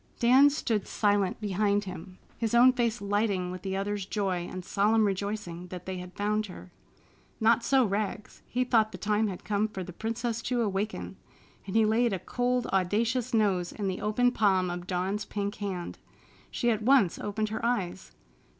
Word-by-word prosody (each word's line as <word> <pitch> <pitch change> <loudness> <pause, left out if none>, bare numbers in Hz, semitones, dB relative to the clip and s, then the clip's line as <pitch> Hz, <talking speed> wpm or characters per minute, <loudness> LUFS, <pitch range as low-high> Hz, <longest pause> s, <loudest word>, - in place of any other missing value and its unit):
Dan 260 +4 +6
stood 230 -8 -1
silent 205 -3 +1
behind 205 0 +1
him, 185 -1 -9 0.2
his 230 0 -1
own 250 +2 +7
face 235 -3 0
lighting 200 -3 0
with 185 -1 -7
the 190 0 -3
other's 205 0 -2
joy 185 -3 -2
and 185 -1 -6
solemn 215 +3 +3
rejoicing 195 -3 -3
that 180 0 -8
they 190 -1 -4
had 180 0 -9
found 210 +1 0
her. 180 0 -11 0.7
Not 230 +1 +4
so 265 -1 +4
Rags. 205 0 -3
He 250 +1 0
thought 225 -3 +2
the - - -7
time 210 +1 +1
had 185 -3 -6
come 210 +1 0
for 195 -3 -6
the 180 - -9
princess 230 +3 -3
to 240 0 0
awaken 205 +1 -3 0.5
and 190 - -5
he 225 -1 +5
laid 225 +1 +2
a - - 0
cold, 245 +5 -1
audacious 225 +6 +1
nose 195 -6 +1
in 205 -2 -4
the 190 -1 -3
open 245 +4 +2
palm 190 -6 +2
of 175 0 -6
Dawn's 190 +3 -1
pink 200 0 -3
hand. 190 -4 -5 0.5
She 240 -1 0
at 220 -1 -1
once 235 -6 +4
opened 210 +1 -2
her 220 +1 -4
eyes. 195 -7 -2
205 Hz, 180 wpm, -28 LUFS, 190-225 Hz, 0.7 s, own